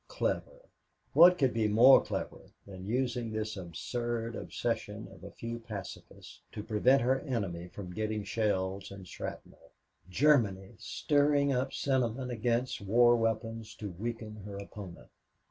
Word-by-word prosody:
Clever - - -2 0.5
what 180 +2 +8
could 135 -5 +2
be 110 -2 +1
more 120 +6 +7
clever - - -5 0.2
than 95 -1 -9
using 120 -1 -1
this 110 0 -3
absurd 115 +6 -4
obsession - - -3
of - - -15
a - - -7
few 115 0 -6
pacifists 105 -6 -9
to 105 - -5
prevent 125 +5 +3
her 130 +2 +2
enemy 100 - -3
from 90 0 -8
getting 110 +1 -2
shells 100 -2 -1
and 100 -2 -10
shrapnel! - - -9 0.4
Germany 110 -5 +2
stirring 145 -1 +2
up 130 +1 -1
sentiment 130 -2 -1
against 120 +1 -1
war 120 +4 +5
weapons 115 -1 -2
to 105 -3 -6
weaken 110 +3 -5
her 100 -1 -8
opponent! 100 -3 -10
115 Hz, 135 wpm, -31 LUFS, 100-125 Hz, 0.5 s, what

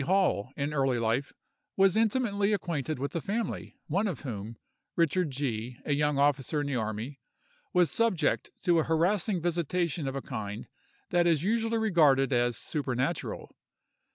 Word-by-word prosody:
Hall, 175 - +1
in 145 +1 -1
early 135 -3 +2
life, 115 +4 0 0.5
was 195 0 +5
intimately 215 -2 +2
acquainted 160 -6 -2
with 140 +5 -4
a 165 - 0
family, 220 +6 -3
one 195 +7 0
of 175 -10 -4
whom, 115 -4 -6 0.4
Richard 170 0 +2
G——, 125 -3 -3
a 145 - +1
young 150 0 +1
officer 145 +1 +2
in - - -2
the 140 -2 -2
army, 110 +4 -3 0.5
was 180 -4 +3
subject 230 -7 +1
to 175 -2 +4
a - - +2
harassing 180 +4 +1
visitation 170 -2 -1
of 135 - -3
a 135 - -2
kind 105 -5 -5 0.4
that 175 -1 +3
is 160 -3 +3
usually 225 +2 +1
regarded 150 -11 +4
as 120 -1 +2
supernatural. 135 -4 -2
150 Hz, 155 wpm, -29 LUFS, 135-185 Hz, 0.5 s, was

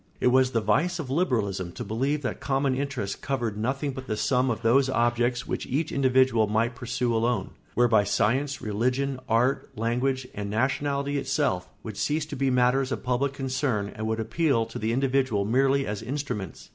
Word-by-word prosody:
It - - +3
was 130 0 +4
the 115 -3 0
vice 155 - +1
of 145 -6 -5
liberalism 105 - 0
to - - -5
believe 135 +8 -1
that 130 - -3
common 135 0 0
interests 130 -7 -2
covered 120 -6 -2
nothing 135 +6 -1
but 130 0 -8
the 110 - -2
sum 125 +5 +2
of 115 0 -2
those 130 +4 +4
objects 120 0 +1
which - - -3
each 150 +4 -1
individual 130 -4 +3
might 115 +3 +1
pursue 120 0 -2
alone; 115 +2 0 0.2
whereby 115 -4 +4
science, 130 +8 0
religion, 125 +5 0
art, 125 +5 +2
language, 125 +3 0
and 100 0 -4
nationality 140 +5 0
itself 135 -9 -1
would 110 -3 -7
cease 150 +1 0
to 150 - -7
be 135 0 +1
matters 130 +1 +2
of - - -3
public 130 +2 0
concern 130 -6 -1
and 110 0 -3
would 110 0 -1
appeal 115 +1 +1
to - - -7
the 110 +1 -1
individual 130 -5 +1
merely 135 +4 +2
as 105 0 -4
instruments. 125 - -5
125 Hz, 180 wpm, -26 LUFS, 110-135 Hz, 0.2 s, was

